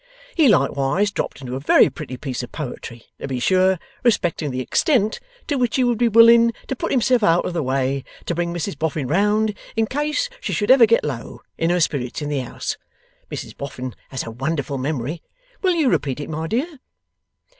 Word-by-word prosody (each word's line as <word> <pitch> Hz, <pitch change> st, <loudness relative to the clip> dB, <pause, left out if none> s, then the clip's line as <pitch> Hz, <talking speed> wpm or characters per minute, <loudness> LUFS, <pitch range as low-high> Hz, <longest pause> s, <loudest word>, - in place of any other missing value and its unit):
He 315 Hz, -4 st, +4 dB
likewise 145 Hz, -, +2 dB
dropped 150 Hz, -, -4 dB
into 125 Hz, -1 st, -5 dB
a -, -, -3 dB
very 140 Hz, -, +5 dB
pretty 130 Hz, -4 st, -7 dB
piece 130 Hz, -2 st, -4 dB
of 125 Hz, -, -8 dB
poetry 120 Hz, -5 st, -7 dB
to -, -, -5 dB
be 130 Hz, -2 st, -3 dB
sure, 185 Hz, +6 st, +3 dB, 0.3 s
respecting 175 Hz, -10 st, +1 dB
the 130 Hz, -1 st, -3 dB
extent 220 Hz, -, +1 dB, 0.3 s
to 290 Hz, -, -1 dB
which 245 Hz, -3 st, +1 dB
he 260 Hz, -, +3 dB
would 240 Hz, -2 st, +1 dB
be 240 Hz, -, +4 dB
willing 230 Hz, +1 st, +6 dB, 0.2 s
to 265 Hz, -, -1 dB
put -, -, -3 dB
himself 250 Hz, -1 st, +2 dB
out 170 Hz, -3 st, +3 dB
of 180 Hz, -, -3 dB
the 170 Hz, -, -1 dB
way 135 Hz, 0 st, -1 dB, 0.2 s
to -, -, -1 dB
bring 170 Hz, 0 st, -1 dB
Mrs 160 Hz, -4 st, -4 dB
Boffin 155 Hz, -3 st, -1 dB
round, 210 Hz, +6 st, +2 dB, 0.2 s
in 225 Hz, -1 st, +2 dB
case 300 Hz, -, -1 dB
she -, -, -3 dB
should 210 Hz, +2 st, +2 dB
ever 255 Hz, -4 st, +7 dB
get 230 Hz, +1 st, +3 dB
low 130 Hz, -6 st, -6 dB
in 165 Hz, -, 0 dB
her 175 Hz, +1 st, +2 dB
spirits 140 Hz, -7 st, -1 dB
in 150 Hz, -1 st, -4 dB
the 145 Hz, -2 st, -1 dB
house. 125 Hz, -, -4 dB, 0.5 s
Mrs -, -, -7 dB
Boffin 130 Hz, -3 st, -6 dB, 0.2 s
has 130 Hz, -, -4 dB
a 115 Hz, -, -7 dB
wonderful 140 Hz, +3 st, -3 dB
memory. 145 Hz, +3 st, -3 dB, 0.4 s
Will 370 Hz, -3 st, +2 dB
you 315 Hz, -5 st, +2 dB
repeat 140 Hz, -, 0 dB
it, 145 Hz, -, -6 dB
my 160 Hz, +1 st, -3 dB
dear? 275 Hz, -, -2 dB
165 Hz, 200 wpm, -21 LUFS, -, 0.5 s, ever